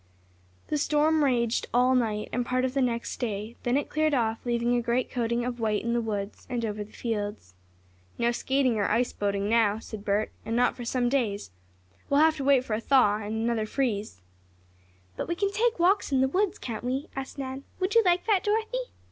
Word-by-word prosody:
The 300 - 0
storm 305 +1 +3
raged 235 -4 +1
all 250 +1 +4
night, 220 -4 0
and 245 - +1
part 255 +1 0
of 255 - -2
the 275 - +1
next 235 -2 -1
day. 220 -1 -3
Then 245 +2 +1
it 285 - -1
cleared 310 -1 +1
off, 225 -3 0
leaving 240 0 +1
a 240 - +2
great 240 +2 0
coating 235 -1 -1
of 245 -1 -4
white 215 -2 0
in 235 0 -1
the 240 - +1
woods, 205 -2 -4
and 240 -2 -1
over 210 -1 -3
the 210 - -16
fields. 205 - -4 0.6
"No 235 0 +2
skating 260 -1 +1
or 205 - +1
ice 240 +3 +1
boating 200 0 -1
now," 220 -2 +3
said 220 -2 -8
Bert, 210 +1 0
"and 225 +1 -3
not 245 +1 +3
for 240 - -7
some 245 +1 0
days. 225 - -1 0.6
We'll 280 - +4
have 315 0 +4
to 275 - -3
wait 270 -2 +4
for 225 - -3
a 215 - -1
thaw 230 -6 +4
and 220 +1 -3
another 230 -2 0
freeze." 215 - -2 0.9
"But - - -3
we 345 - -1
can 395 +2 0
take 450 +3 +1
walks 360 0 +2
in 265 - +3
the 265 - +4
woods; 375 +7 0
can't 225 -3 -6
we?" 260 +3 -2
asked 270 +1 -6
Nan. 265 0 -5 0.2
"Would 370 +1 0
you 460 - +7
like 355 -1 +2
that, 415 -4 +2
Dorothy?" 445 +4 -1
245 Hz, 215 wpm, -27 LUFS, 220-275 Hz, 0.9 s, you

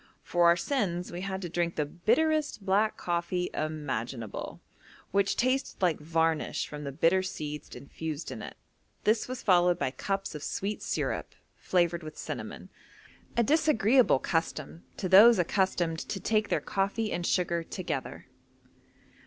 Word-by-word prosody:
For 175 -1 +3
our 170 0 +6
sins 180 -6 -1
we 175 +1 -5
had 190 0 -4
to - - -2
drink 170 0 -1
the 150 - 0
bitterest 290 - +1
black 210 +3 +2
coffee 175 +1 -1
imaginable, 135 -8 -4 0.5
which 200 0 +2
tasted 255 +2 0
like 180 -4 +2
varnish 160 0 0
from 150 -1 -7
the 140 - -3
bitter 165 +6 +3
seeds 150 -5 -6
infused 155 +2 -6
in - - -6
it; - - -8 0.5
this 215 +1 +2
was 255 0 -6
followed 180 -2 +4
by 130 - -1
cups 195 +7 -3
of 150 - -6
sweet 200 +7 -3
syrup - - -2 0.2
flavoured 175 -1 +1
with 155 -1 -9
cinnamon, - - -6 0.7
a 235 - +5
disagreeable 260 - +4
custom 165 +2 -3
to 190 - -2
those 210 +6 +8
accustomed 175 -2 +1
to 195 - -4
take 215 +1 +1
their - - +2
coffee 200 +3 -1
and 175 0 -2
sugar 170 -2 +1
together. 160 -6 -5
180 Hz, 145 wpm, -29 LUFS, 160-205 Hz, 0.7 s, those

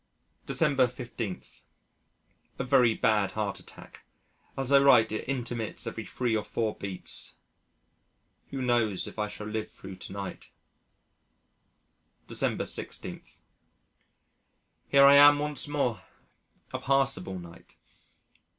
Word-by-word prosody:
December 140 -6 +3
15. 120 -5 -6 1.1
A - - -2
very 125 -3 +4
bad 105 -3 +1
heart 105 -2 -2
attack. - - -14 0.5
As 135 0 -1
I 140 - +8
write 125 -6 +5
it 110 - -4
intermits 120 -4 -3
every 115 -1 -5
three 120 -3 -1
or 105 - 0
four 110 -2 -2
beats. 95 -2 -5 1.1
Who 135 -1 -4
knows 120 -6 +1
if - - -9
I 105 - 0
shall 105 0 -8
live 110 0 -4
thro' 95 0 -11
to 95 - -10
night? 100 -1 -7 1.8
December - - -1
16. - - -4 1.7
Here 140 0 +6
I 140 - +9
am 145 0 +8
once 150 0 -3
more. 140 -6 -1 0.7
A - - -2
passable 135 -9 +1
night. 85 -1 -13
115 Hz, 115 wpm, -28 LUFS, 105-135 Hz, 1.8 s, I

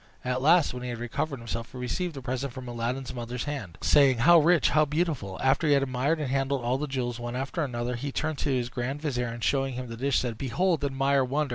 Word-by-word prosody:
At 125 0 -1
last, 160 +1 +4
when 125 - -6
he 125 - -4
had 120 - -4
recovered 120 +5 -3
himself, 115 0 -5
he - - -8
received 160 +7 -3
the 135 - -7
present 130 +1 -3
from 130 -2 -8
Aladdin's 120 +2 -3
mother's 120 0 -4
hand, 130 - -5
saying, 140 -4 +5
"How 170 +9 +7
rich! 170 -1 +4
how 155 +1 +5
beautiful!" 150 - -2
After 135 +4 +3
he 145 - +5
had 140 -1 +3
admired 135 +5 0
and 150 - -2
handled 135 -1 0
all 125 +3 0
the 150 - -2
jewels 125 -3 -3
one 120 0 -5
after 135 +6 -2
another, 120 -2 -2
he 140 +4 -4
turned 155 +1 -2
to - - -1
his 125 -3 0
grand 125 +3 -3
vizier, 125 -5 -1
and, 115 0 -6
showing 135 0 +1
him 125 -1 -5
the 115 - -7
dish, 135 +2 +1
said, 115 -3 -2
"Behold! 160 +5 0
admire! 135 0 +2
wonder! 140 +3 -1
130 Hz, 245 wpm, -27 LUFS, 120-145 Hz, -, How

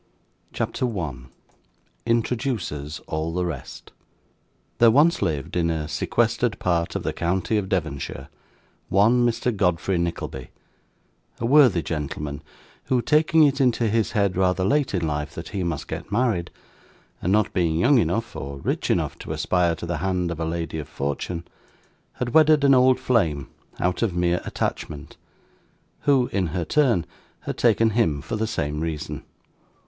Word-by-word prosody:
CHAPTER 130 - -2
1 75 - -5 0.8
Introduces 115 - -1
all 80 +1 -2
the 90 0 0
Rest 80 -7 -7 0.9
There 115 - +7
once 150 +8 +4
lived, 80 -7 -2
in 85 -1 +1
a 80 -2 -2
sequestered 115 - 0
part 85 -2 0
of - - -2
the - - -2
county 95 +5 -1
of 100 -3 -1
Devonshire, 80 -7 -3 0.6
one 115 +5 +4
Mr. 120 0 0
Godfrey 90 -1 +1
Nickleby: 85 -6 -4 0.9
a 115 - -2
worthy 125 - +5
gentleman, 75 -1 -4 0.4
who, 130 - +2
taking 155 +4 +4
it 140 -1 +3
into 120 -3 +2
his 110 -1 0
head 100 -3 +1
rather 95 0 +1
late 140 +1 +1
in 85 -3 0
life 75 -1 -3
that 85 - -7
he 100 -3 -3
must 85 -4 -3
get - - -6
married, 105 -6 +1 0.7
and 90 - 0
not 105 +1 +2
being 85 -3 +1
young 125 - +4
enough 115 0 -1
or 70 0 -6
rich 70 - -2
enough - - 0
to - - -7
aspire 90 -2 +1
to 85 - -7
the 85 0 -2
hand 90 -2 -1
of 85 - -5
a 80 - -1
lady 80 -1 -3
of 75 - -6
fortune, 70 +5 -3 0.7
had 120 -1 -4
wedded 155 -2 +5
an 140 -1 +6
old 130 0 +5
flame 80 - 0 0.3
out 90 0 0
of 105 -7 0
mere 90 0 +1
attachment, 75 -2 -4 0.9
who 135 -3 +4
in 95 -3 0
her 85 +2 -3
turn 120 - +2 0.4
had - - -4
taken 115 -1 +3
him 105 -10 +1
for 85 - -4
the 110 +1 -1
same 75 -8 -2
reason. 80 -2 -4
90 Hz, 155 wpm, -24 LUFS, 80-115 Hz, 0.9 s, There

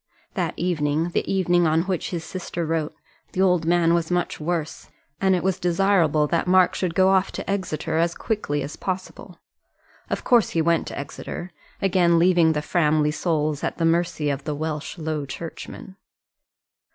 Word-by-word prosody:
That - - -2
evening 160 -2 0
the - - -1
evening 175 -3 +3
on 160 +1 +2
which 185 -2 -2
his 170 -3 -4
sister 175 -1 -4
wrote 160 -1 -2 0.4
the 185 - 0
old 180 -3 +3
man 170 -1 +3
was 170 -1 0
much 175 0 -1
worse, 165 0 -3 0.3
and 190 -1 +3
it 180 - -2
was 190 -1 0
desirable 175 -4 +2
that 170 +3 0
Mark 185 0 +5
should 175 -3 -2
go 190 0 +5
off 190 0 +2
to - - -6
Exeter 165 -5 -2
as 170 +1 +1
quickly 145 - -2
as 145 - -6
possible. 185 0 -6 0.7
Of - - -2
course 240 -4 +4
he - - +4
went 170 0 +1
to - - -6
Exeter 175 +5 -6 0.3
again 175 -3 +3
leaving 170 -2 +4
the 150 -1 -2
Framley 150 -2 +2
souls 155 -2 -1
at - - -2
the 165 - +1
mercy 165 -3 +1
of 140 0 -4
the 150 -2 -2
Welsh 155 +2 -4
Low 155 -3 -3
Churchman. 170 +5 -8
170 Hz, 175 wpm, -23 LUFS, 155-180 Hz, 0.7 s, Mark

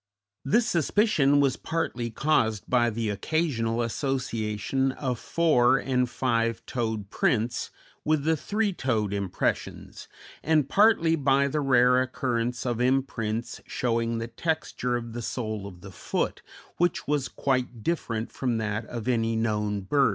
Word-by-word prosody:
This 225 - +3
suspicion 160 -5 +3
was 140 -3 +2
partly 125 -8 -2
caused 110 -4 +1
by 120 -2 +3
the 110 -1 -2
occasional 120 - 0
association 125 0 -1
of 125 -4 -3
four 135 -7 +3
and 125 -2 0
five 115 -3 0
toed 110 -5 -3
prints 120 0 0 0.3
with 155 -2 +1
the 160 +1 +2
three 205 +6 -1
toed 110 - -1
impressions, 100 -2 -3 0.3
and 155 -3 +2
partly 195 -4 +4
by 140 -2 +3
the 150 +2 -1
rare 125 -2 +4
occurrence 125 -2 -2
of 120 -1 -1
imprints 125 -4 -1
showing 115 -1 -1
the 115 - -3
texture 125 -1 -2
of 115 -1 -5
the 120 - -4
sole 110 -4 -4
of 90 -3 -12
the 95 - -10
foot, - - -2 0.4
which 175 0 0
was 145 -2 0
quite 125 -4 -2
different 115 -9 -2
from 125 -3 -1
that 110 0 -2
of 120 -1 -6
any 115 -2 +1
known 105 -2 0
bird. 140 +7 +3
125 Hz, 140 wpm, -27 LUFS, 115-140 Hz, 0.4 s, partly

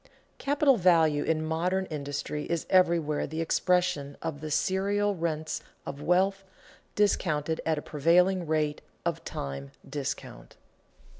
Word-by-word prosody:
Capital 280 -2 +3
value 165 -5 +4
in 155 -1 0
modern 180 +4 0
industry 145 -1 -4
is 170 -2 -2
everywhere 170 -5 +3
the 160 - -5
expression 165 -4 +1
of 150 -3 -5
the 155 - -5
serial 200 +5 +1
rents 160 -2 -2 0.2
of 140 - -6
wealth, 190 +4 +2 0.5
discounted 160 -6 +1
at 160 -1 +2
a 150 - -4
prevailing 175 +4 +3
rate 155 -1 0 0.2
of - - -1
time 70 0 -5 0.2
discount. - - -5
160 Hz, 125 wpm, -28 LUFS, 150-185 Hz, 0.5 s, value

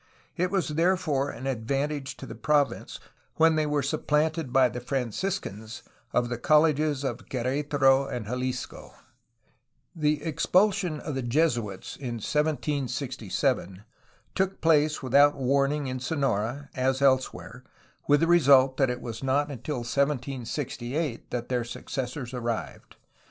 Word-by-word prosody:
It 180 +1 0
was 190 -4 0
therefore 160 -3 +1
an 120 +3 -7
advantage 135 +3 -2
to - - -8
the - - -8
province 145 -2 0 0.4
when 160 0 +5
they 155 -1 +1
were 145 -1 0
supplanted 155 +1 0
by 130 0 +5
the 125 0 -6
Franciscans 125 - -3 0.3
of 120 0 +1
the 120 -1 -4
colleges 150 -1 +3
of 135 - -4
Quer^taro 135 +1 +2
and 120 -3 -4
Jalisco. 125 +2 -4 1.0
The 150 -2 0
expulsion 180 +1 +1
of 150 - -5
the 135 - -2
Jesuits 120 - -1
in 125 -4 -4
1767 125 - -1 0.5
took 190 0 -1
place 150 -2 +3
without 140 +3 +5
warning 140 +2 +1
in 130 -1 -3
Sonora 135 -2 -2
as 130 +1 0
elsewhere, 130 -1 0 0.4
with 145 0 +4
the 165 - +3
result 135 -6 +5
that 135 -2 +3
it 125 0 -3
was 115 -1 -6
not 140 +2 +1
until 130 +1 -4
1768 135 +1 -2
that 120 -1 -3
their 125 -2 0
successors 125 +1 -5
arrived. 120 -2 -4
135 Hz, 130 wpm, -27 LUFS, 125-150 Hz, 1.0 s, when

